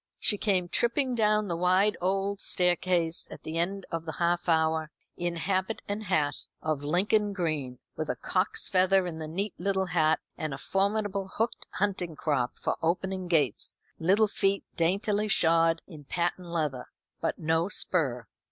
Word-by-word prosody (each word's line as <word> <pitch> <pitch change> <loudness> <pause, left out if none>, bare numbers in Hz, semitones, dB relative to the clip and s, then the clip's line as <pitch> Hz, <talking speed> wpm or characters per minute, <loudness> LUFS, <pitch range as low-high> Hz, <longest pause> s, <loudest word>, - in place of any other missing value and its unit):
She 205 - +3
came 185 -4 +1
tripping 245 +7 +1
down 215 -2 +2
the 170 - -1
wide 185 +4 +3
old 195 +2 0
staircase 175 -2 +1
at - - -10
the 160 +1 -3
end 195 +3 -1
of 165 -1 -3
the 160 - -4
half 175 +1 0
hour, 160 -1 +2 0.3
in 175 0 -2
habit 190 +5 -1
and 210 +1 -3
hat 150 -6 0
of 155 -2 -2
Lincoln 205 +7 +2
green, 155 -9 -2 0.2
with 155 -1 -4
a - - 0
cock's 185 +1 +1
feather 190 -1 +4
in 165 -2 -5
the 155 - -5
neat 195 +6 -3
little 190 +1 0
hat, 160 -3 +2 0.2
and 155 -3 -3
a - - -8
formidable 200 +4 0
hooked 225 +2 -2
hunting 185 -5 -1
crop 140 -5 -1
for - - -2
opening 185 +2 -1
gates, 150 - +1 0.2
little 195 +6 +4
feet 195 -1 0
daintily 200 +5 +1
shod 165 -3 +4
in 155 -5 -12
patent 175 +3 -2
leather, 155 -7 -2 0.3
but - - -1
no 160 +3 +1
spur. 135 - 0
180 Hz, 160 wpm, -28 LUFS, 160-195 Hz, 0.3 s, feather